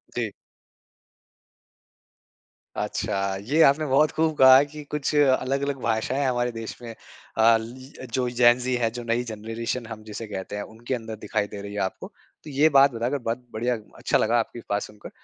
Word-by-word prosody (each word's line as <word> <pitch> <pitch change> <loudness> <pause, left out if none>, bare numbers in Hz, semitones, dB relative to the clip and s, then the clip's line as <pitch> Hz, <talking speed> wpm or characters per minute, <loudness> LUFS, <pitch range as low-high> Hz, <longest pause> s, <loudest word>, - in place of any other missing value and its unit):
जी। - - -2 2.5
अच्छा, 95 0 -2
ये 145 +10 +1
आपने 150 +3 +4
बहुत 140 +3 +3
खूब 160 0 +1
कहा 130 0 +9
है 140 - +4
कि 150 +1 -10
कुछ 150 0 -2
अलग-अलग 140 0 +2
भाषाएँ 115 +5 0
हमारे 120 -1 0
देश 115 -1 -7
में 120 - -8
अ, 115 0 +1
ल 110 - -5 0.4
ल 130 - -7
जो 125 0 0
जेन 120 0 +5
ज़ी 125 0 -2
है, 120 -2 +1
जो 120 0 -7
नई 115 +1 0
जनरेशन 115 +2 -4
हम 110 -2 -8
जिसे 110 +1 -7
कहते 100 0 -6
हैं 105 - -3
उनके 120 +3 -5
अंदर 115 -2 -6
दिखाई 105 -1 -1
दे 100 0 -8
रही 100 0 -8
है 105 - -3
आपको। 95 - -3 0.4
तो 155 - -10
ये 145 +3 +4
बात 140 -1 +6
बताकर 120 +5 -1
बहुत 120 0 -4
बढ़िया, 120 +3 0 0.2
अच्छा - - +1
लगा 115 +2 +2
आपकी 115 +1 -4
बात 100 0 0
सुनकर। 105 -1 -10
120 Hz, 185 wpm, -25 LUFS, 110-135 Hz, 2.5 s, कहा